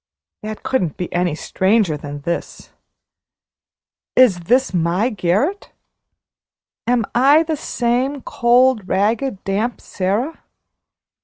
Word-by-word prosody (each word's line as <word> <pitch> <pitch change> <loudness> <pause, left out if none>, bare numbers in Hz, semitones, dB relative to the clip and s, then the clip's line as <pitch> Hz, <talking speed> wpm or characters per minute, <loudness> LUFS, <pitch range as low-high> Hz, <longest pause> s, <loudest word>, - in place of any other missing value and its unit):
That 215 0 -7
couldn't 180 - -1
be 180 - -5
any 175 -3 0
stranger 190 0 +1
than 145 0 -7
this. 170 +4 -5 1.4
Is 245 -8 +5
this 255 +2 +2
my 180 +7 +1
garret? 210 - -1 1.2
Am 240 -2 +2
I 280 +6 +5
the 320 -1 -2
same 255 +1 -1
cold, 240 -3 +2
ragged, 215 +3 0
damp 210 +5 -2
Sara? 205 - -3
220 Hz, 100 wpm, -19 LUFS, 185-255 Hz, 1.4 s, Is